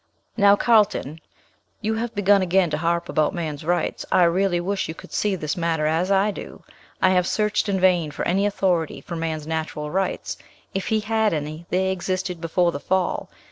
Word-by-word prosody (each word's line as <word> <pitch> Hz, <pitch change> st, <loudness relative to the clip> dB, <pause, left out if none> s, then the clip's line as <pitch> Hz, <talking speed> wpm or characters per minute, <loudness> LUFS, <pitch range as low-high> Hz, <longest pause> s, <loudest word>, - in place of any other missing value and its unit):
"Now, 200 Hz, -2 st, +6 dB
Carlton, 205 Hz, -, +2 dB, 0.6 s
you 220 Hz, +1 st, -1 dB
have 230 Hz, +1 st, -3 dB
begun 205 Hz, 0 st, +4 dB
again 185 Hz, -2 st, +2 dB
to 150 Hz, -, 0 dB
harp 170 Hz, +1 st, 0 dB
about 155 Hz, +3 st, +1 dB
man's 155 Hz, -3 st, -4 dB
rights; 175 Hz, +1 st, -1 dB
I 180 Hz, -, +5 dB
really 175 Hz, +1 st, +2 dB
wish 190 Hz, +2 st, -2 dB
you 160 Hz, -, -6 dB
could -, -, -13 dB
see 205 Hz, -2 st, +1 dB
this 155 Hz, -2 st, -3 dB
matter 165 Hz, -3 st, 0 dB
as 165 Hz, +4 st, +1 dB
I 200 Hz, +1 st, +3 dB
do. -, -, -9 dB, 0.4 s
I 185 Hz, -, +6 dB
have 180 Hz, -1 st, +2 dB
searched 210 Hz, 0 st, 0 dB
in 195 Hz, -1 st, +1 dB
vain 180 Hz, -4 st, +3 dB
for 145 Hz, -, -4 dB
any 195 Hz, +3 st, +2 dB
authority 180 Hz, -5 st, 0 dB
for 170 Hz, -, -7 dB
man's 160 Hz, -2 st, -3 dB
natural 155 Hz, -1 st, -3 dB
rights; 190 Hz, +1 st, -2 dB, 0.4 s
if 195 Hz, -1 st, -3 dB
he 220 Hz, -1 st, +1 dB
had 220 Hz, -1 st, +1 dB
any, 155 Hz, +3 st, -5 dB
they 190 Hz, +1 st, +1 dB
existed 185 Hz, -1 st, -3 dB
before 170 Hz, +1 st, +1 dB
the 140 Hz, -, -5 dB
fall. 185 Hz, +3 st, -1 dB
180 Hz, 190 wpm, -23 LUFS, 165-195 Hz, 0.6 s, Now